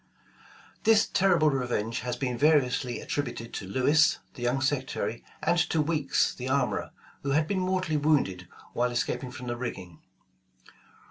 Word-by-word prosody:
This 220 -1 +5
terrible 175 -6 +3
revenge 120 -4 -1
has 125 -1 -3
been 125 -1 -2
variously 125 -3 +2
attributed 120 -5 -4
to 95 - -5
Lewis, 130 +9 +3 0.2
the - - -11
young 120 +2 +1
secretary, 130 -4 -2 0.2
and 175 - +2
to 160 - +1
Weeks 150 -2 +1
the 130 +1 -5
armorer, 130 -2 0 0.3
who 140 0 -1
had 155 +1 +2
been 195 +1 0
mortally 185 -4 0
wounded 135 - +1 0.3
while 125 +1 +1
escaping 120 +1 -2
from 125 0 -9
the 120 -1 -2
rigging. 95 -9 -6
130 Hz, 145 wpm, -28 LUFS, 120-155 Hz, 0.3 s, This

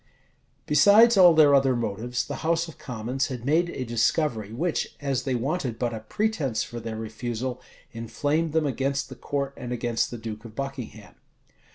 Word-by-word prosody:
Besides 210 +10 +6
all 180 -4 +7
their 150 -2 +6
other 135 -2 +4
motives, 120 +2 -2
the 145 - -5
house 165 +1 0
of 165 - -12
commons 125 +3 -3
had 125 -3 -6
made 165 +5 +2
a 130 -6 -4
discovery, 115 -1 0
which, 160 +9 -2
as 135 -3 -2
they 130 -2 0
wanted 130 -1 -2
but 120 0 -1
a 110 - -4
pretence 140 - -1
for 120 - -7
their 115 -1 -5
refusal, 120 +3 -4 0.3
inflamed 145 +8 -1
them 160 -1 +2
against 140 +1 -1
the - - -9
court 140 -1 -3
and 125 -1 -7
against 120 -1 -1
the 120 - -6
duke 110 -1 -7
of 115 -2 -11
Buckingham. 125 -7 -6
130 Hz, 175 wpm, -26 LUFS, 115-150 Hz, 0.3 s, all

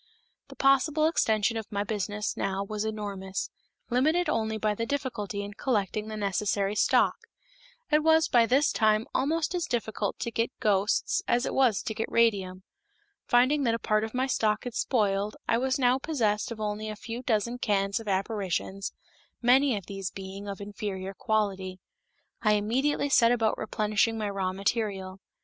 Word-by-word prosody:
The - - -12
possible 280 +3 +3
extension 225 -8 +2
of 220 - -6
my 200 -1 -1
business 210 0 -3
now 195 0 -1
was 210 +1 -4
enormous, 200 -3 -4 0.4
limited 315 +8 +2
only 220 -5 0
by 215 0 0
the 230 - -3
difficulty 235 -8 -3
in 205 0 -7
collecting 210 -2 -1
the 215 0 -5
necessary 200 0 0
stock. 210 - +3 0.8
It 300 +1 +5
was 320 0 +4
by 235 -2 +4
this 275 +5 +3
time 215 0 +2
almost 315 +5 0
as 350 -1 -1
difficult 220 -4 -2
to 235 - -3
get 230 +2 -2
ghosts 205 - +1
as 240 +1 +2
it - - -3
was 250 -6 +3
to 220 - -3
get 220 +1 -4
radium. 195 -5 +1 0.6
Finding 255 +5 +4
that 230 -1 +2
a - - -1
part 215 -1 +1
of 220 +2 -5
my 255 +1 +1
stock 215 -5 0
had 245 - -5
spoiled, 205 -4 0
I 230 - +2
was 265 +2 0
now 255 -1 +3
possessed 225 -9 0
of 225 - -6
only 215 0 -3
a 215 - -5
few 230 +3 -6
dozen 235 0 0
cans 200 -2 +1
of 225 - -10
apparitions, 195 -1 -2 0.5
many 250 0 +4
of 195 - -7
these 195 -1 -5
being 195 +1 -8
of 200 -1 -5
inferior 200 -2 -5
quality. 195 -3 -1 0.6
I 215 -1 +3
immediately 260 +8 +1
set 235 -3 +5
about 225 -3 +2
replenishing 215 +1 0
my 210 -2 -2
raw 190 -2 -1
material. 195 -1 -2
215 Hz, 170 wpm, -28 LUFS, 200-245 Hz, 0.8 s, It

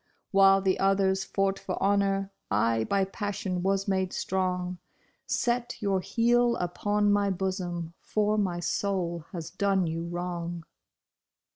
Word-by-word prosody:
While 195 0 +6
the 190 -1 +1
others 195 0 +2
fought 195 0 0
for - - -4
honor, 195 -1 +1 0.2
I 110 +2 +2
by 195 - +1
passion 195 -2 -3
was 195 +1 0
made 190 -1 0
strong; 180 -1 -1 0.5
Set 240 0 -1
your 200 -3 +1
heel 240 +4 +2
upon 205 +4 0
my 205 0 +3
bosom 180 -3 -3
for 210 0 0
my 190 -5 0
soul 175 -4 -1
has 170 -4 -6
done 195 -1 +1
you 165 +1 -3
wrong. 175 -1 -4
190 Hz, 130 wpm, -28 LUFS, 175-200 Hz, 0.5 s, While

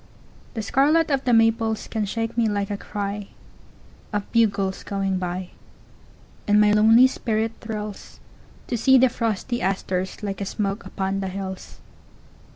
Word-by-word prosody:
The 220 - -3
scarlet 295 +8 +3
of 275 -1 0
the 250 - +2
maples 225 -1 +2
can 220 -2 -2
shake 225 +3 -3
me 230 -2 +2
like 205 -1 -2
a - - -1
cryOf 205 0 -4 1.0
bugles 200 -4 +1
going 195 -2 -2
by. 180 0 -4 1.0
And 205 0 +5
my 210 0 +5
lonely 220 +4 +6
spirit 225 -3 0
thrillsTo 215 -2 -7 0.6
see 265 +4 +5
the 260 0 +5
frosty 230 +1 -2
asters 190 +1 -2
like 195 -1 -4
a - - -1
smoke 200 +1 -3
upon 195 0 -2
the 195 - -2
hills. 190 0 -7
210 Hz, 140 wpm, -23 LUFS, 195-230 Hz, 1.0 s, lonely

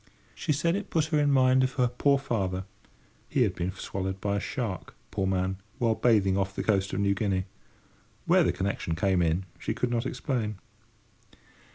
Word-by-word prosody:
She - - -2
said 165 +4 +1
it 205 0 -4
put 160 -3 +2
her 150 - +4
in 145 -1 +3
mind 130 -1 +5
of 130 0 0
her 125 -3 +2
poor 140 +3 +2
father 95 -8 -2 0.6
(he - - +3
had - - +1
been 90 +1 -2
swallowed 95 0 -4
by 100 0 0
a - - +1
shark, 100 -5 -4 0.2
poor 95 - -1
man, 95 0 0 0.2
while 115 -4 +2
bathing 100 -5 +3
off 95 0 -2
the - - -2
coast 100 -2 +1
of - - -2
New 100 0 +3
Guinea—where 100 -1 -2
the - - +2
connection 95 -4 -2
came 95 +2 +2
in, 85 +3 +1
she - - -2
could 125 - -1
not 120 -1 0
explain). 115 - -2
100 Hz, 185 wpm, -28 LUFS, 95-125 Hz, 0.6 s, mind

